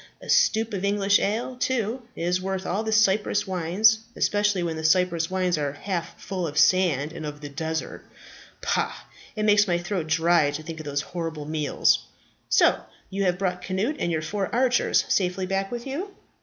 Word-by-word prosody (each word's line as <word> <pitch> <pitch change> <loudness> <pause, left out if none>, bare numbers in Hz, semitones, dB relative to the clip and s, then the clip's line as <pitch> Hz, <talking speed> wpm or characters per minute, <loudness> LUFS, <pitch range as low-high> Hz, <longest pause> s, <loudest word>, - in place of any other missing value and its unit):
A - - -13
stoup 225 - +3
of 195 -1 -3
English 200 0 +3
ale, 230 +5 -1
too, 250 -1 -1
is 180 +2 -1
worth 190 0 -3
all 195 +4 -1
the 220 0 -3
Cyprus 215 -1 +2
wines, 190 +4 +3 0.2
especially 205 -3 +1
when 165 -2 -2
the 160 - -5
Cyprus 170 0 +2
wines 185 -3 0
are 145 -2 -2
half 175 +1 -4
full 185 -3 -3
of 145 - -7
the - - +3
sand 160 -5 +3
of 150 -1 -6
the 145 - -7
desert. 160 +3 -4 0.6
Pah! - - 0 0.4
it 215 - -2
makes 210 0 +4
my 175 -2 +2
throat 175 -1 -3
dry 165 -1 +3
to 145 +2 -5
think 160 0 -7
of 155 - -8
those 145 0 -1
horrible 165 -3 -5
meals. 150 -2 +2 0.5
So - - +4 0.3
you 195 +1 -1
have 180 -1 +1
brought 180 -2 -2
Cnut 205 +11 -1
and 170 - -1
your 160 -1 -1
four 195 +4 -2
archers 250 0 +2
safely 185 0 0
back 195 +1 -1
with 240 -1 -5
you?" 300 +9 -4
185 Hz, 185 wpm, -25 LUFS, 165-210 Hz, 0.6 s, makes